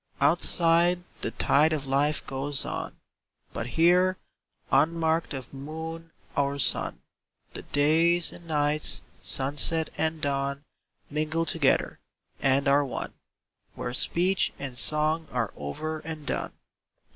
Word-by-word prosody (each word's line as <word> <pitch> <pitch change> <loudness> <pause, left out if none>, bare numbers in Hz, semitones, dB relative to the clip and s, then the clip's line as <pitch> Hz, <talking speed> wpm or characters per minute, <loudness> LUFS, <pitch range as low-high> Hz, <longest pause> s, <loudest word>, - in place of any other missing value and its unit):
Outside 175 +1 +3 0.2
the - - -1
tide 150 +3 +3
of 145 -3 -3
life 140 +3 +1
goes 135 +1 -2
on, - - -5 0.6
But 115 - -4
here, 180 +7 +3 0.5
unmarked 160 +3 +2
of 130 -1 -8
moon 160 +4 -7 0.3
or 140 0 0
sun, 140 - 0 0.5
The - - -6
days 165 +4 +2
and 170 - -12
nights— 150 -1 0 0.2
sunset 150 +4 +1
and 160 0 0
dawn 140 -1 -2 0.5
Mingle 155 +2 -1
together, 160 -5 +1 0.4
and 135 +1 +2
are 140 +1 +4
one, 135 - -5 0.6
Where 120 - -4
speech 180 +8 +2
and 135 -3 -6
song 155 +4 +3
are 115 -5 -2
over 155 - -5
and 155 -1 -8
done. - - -3
155 Hz, 120 wpm, -27 LUFS, 140-165 Hz, 0.6 s, are